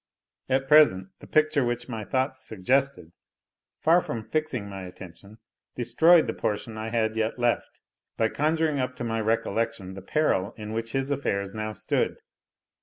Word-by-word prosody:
At 135 Hz, +1 st, +1 dB
present, 135 Hz, -12 st, +5 dB
the -, -, -13 dB
picture 155 Hz, -2 st, +3 dB
which 120 Hz, 0 st, -2 dB
my 110 Hz, -4 st, -5 dB
thoughts 130 Hz, +3 st, -1 dB
suggested, 125 Hz, -1 st, 0 dB, 0.7 s
far 170 Hz, +3 st, +4 dB
from 115 Hz, -8 st, -5 dB
fixing 155 Hz, -7 st, -2 dB
my 95 Hz, -1 st, -7 dB
attention, 95 Hz, +4 st, -12 dB, 0.4 s
destroyed 160 Hz, +8 st, +5 dB
the 115 Hz, -, -2 dB
portion 110 Hz, +1 st, -3 dB
I 110 Hz, +1 st, -4 dB
had 110 Hz, -1 st, 0 dB
yet 110 Hz, +1 st, -1 dB
left, 120 Hz, -1 st, -1 dB, 0.4 s
by 110 Hz, 0 st, +2 dB
conjuring 155 Hz, +1 st, +1 dB
up 130 Hz, 0 st, -2 dB
to 125 Hz, -, -6 dB
my 115 Hz, -1 st, -1 dB
recollection 110 Hz, -3 st, -1 dB
the 95 Hz, -, -8 dB
peril 105 Hz, -4 st, 0 dB
in 105 Hz, 0 st, -6 dB
which 115 Hz, 0 st, -4 dB
his 135 Hz, +1 st, -1 dB
affairs 100 Hz, -8 st, -1 dB
now 110 Hz, 0 st, -4 dB
stood. -, -, -1 dB
115 Hz, 160 wpm, -26 LUFS, 110-135 Hz, 0.7 s, present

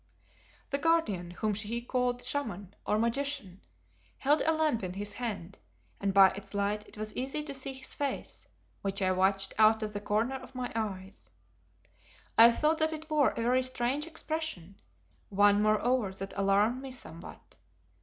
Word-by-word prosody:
The 280 Hz, -, 0 dB
Guardian, 285 Hz, -, +1 dB
whom 210 Hz, +5 st, -2 dB
she 215 Hz, +3 st, -3 dB
called 245 Hz, 0 st, -1 dB
"Shaman" 220 Hz, -8 st, -2 dB
or 210 Hz, -, +2 dB
Magician, 235 Hz, -4 st, -1 dB, 0.6 s
held 290 Hz, +3 st, +2 dB
a 320 Hz, -, +3 dB
lamp 310 Hz, -7 st, +1 dB
in 180 Hz, -2 st, -4 dB
his 205 Hz, +1 st, -4 dB
hand, 200 Hz, -6 st, -5 dB, 0.4 s
and 200 Hz, -, 0 dB
by 195 Hz, -1 st, +7 dB
its 195 Hz, +1 st, -9 dB
light 205 Hz, +1 st, -1 dB
it -, -, -13 dB
was 215 Hz, 0 st, -5 dB
easy 270 Hz, +4 st, -2 dB
to 290 Hz, -2 st, -6 dB
see 270 Hz, 0 st, -3 dB
his 265 Hz, 0 st, -6 dB
face, 280 Hz, -2 st, -4 dB, 0.3 s
which 195 Hz, 0 st, -2 dB
I 185 Hz, -, +3 dB
watched 190 Hz, +1 st, +1 dB
out 220 Hz, 0 st, +5 dB
of 210 Hz, -1 st, -4 dB
the 205 Hz, -, -4 dB
corner 220 Hz, +6 st, 0 dB
of 265 Hz, -, -13 dB
my 250 Hz, -1 st, -3 dB
eye. 195 Hz, -4 st, -3 dB, 1.2 s
I 230 Hz, +1 st, +9 dB
thought 305 Hz, +6 st, +1 dB
that 315 Hz, 0 st, +2 dB
it 310 Hz, 0 st, -8 dB
wore 295 Hz, -3 st, +4 dB
a 230 Hz, -, -4 dB
very 250 Hz, +2 st, +3 dB
strange 255 Hz, +4 st, -1 dB
expression, 315 Hz, -, -4 dB, 0.5 s
one 205 Hz, +1 st, +4 dB
moreover 215 Hz, 0 st, +2 dB
that 195 Hz, +1 st, -6 dB
alarmed 200 Hz, +5 st, +2 dB
me 270 Hz, -, -7 dB
somewhat. 170 Hz, -10 st, -10 dB
225 Hz, 165 wpm, -30 LUFS, 200-265 Hz, 1.2 s, I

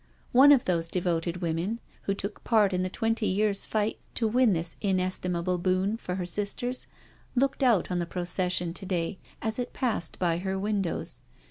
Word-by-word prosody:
One 270 Hz, +4 st, +8 dB
of 275 Hz, -4 st, +5 dB
those 170 Hz, -2 st, +1 dB
devoted 175 Hz, 0 st, -1 dB
women, 170 Hz, +7 st, -1 dB, 0.3 s
who 195 Hz, -, +1 dB
took 200 Hz, +1 st, -6 dB
part 210 Hz, -4 st, +4 dB
in 180 Hz, -, +1 dB
the 185 Hz, -, -1 dB
twenty 225 Hz, +2 st, 0 dB
years* 200 Hz, +1 st, +1 dB
fight 215 Hz, 0 st, 0 dB, 0.2 s
to 225 Hz, -, +1 dB
win 240 Hz, -1 st, +4 dB
this 165 Hz, 0 st, -1 dB
inestimable 185 Hz, -2 st, 0 dB
boon 185 Hz, +4 st, +1 dB
for 180 Hz, -5 st, -4 dB
her 185 Hz, -1 st, -2 dB
sisters, 210 Hz, +7 st, -3 dB, 0.5 s
looked 270 Hz, +2 st, +1 dB
out 235 Hz, -8 st, +3 dB
on 180 Hz, -, +1 dB
the 170 Hz, -, -2 dB
procession 180 Hz, -1 st, -1 dB
to 190 Hz, -, -5 dB
day 180 Hz, 0 st, -1 dB, 0.2 s
as 220 Hz, +2 st, -1 dB
it 245 Hz, -, -3 dB
passed 220 Hz, -10 st, -1 dB
by 170 Hz, -2 st, +1 dB
her 190 Hz, +1 st, -2 dB
windows. 200 Hz, -3 st, -2 dB
190 Hz, 175 wpm, -28 LUFS, 180-220 Hz, 0.5 s, One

